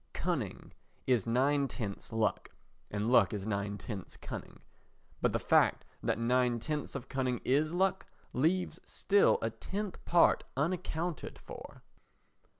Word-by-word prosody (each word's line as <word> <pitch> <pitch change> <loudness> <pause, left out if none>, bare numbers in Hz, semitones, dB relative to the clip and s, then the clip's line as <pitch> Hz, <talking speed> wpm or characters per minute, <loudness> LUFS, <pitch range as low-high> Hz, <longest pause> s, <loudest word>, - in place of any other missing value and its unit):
Cunning - - -3 0.3
is 120 -6 +2
nine 135 +4 +3
tenths 105 -7 -6
luck, 110 -1 0 0.4
and 105 +3 -1
luck 125 - +5
is 100 -2 -3
nine 100 -1 -2
tenths 100 -4 -7
cunning; - - -8 0.6
but - - +3
the - - +1
fact - - +3 0.2
that - - 0
nine 125 +1 +2
tenths 150 +5 -3
of 135 -1 -5
cunning 130 -3 -1
is 150 +4 +2
luck 190 +2 +1 0.3
leaves 170 +7 +1
still 200 0 +3
a 115 - 0
tenth 200 - -5
part 170 -1 +4
unaccounted 170 +1 -2
for. - - -11
130 Hz, 135 wpm, -32 LUFS, 115-160 Hz, 0.6 s, luck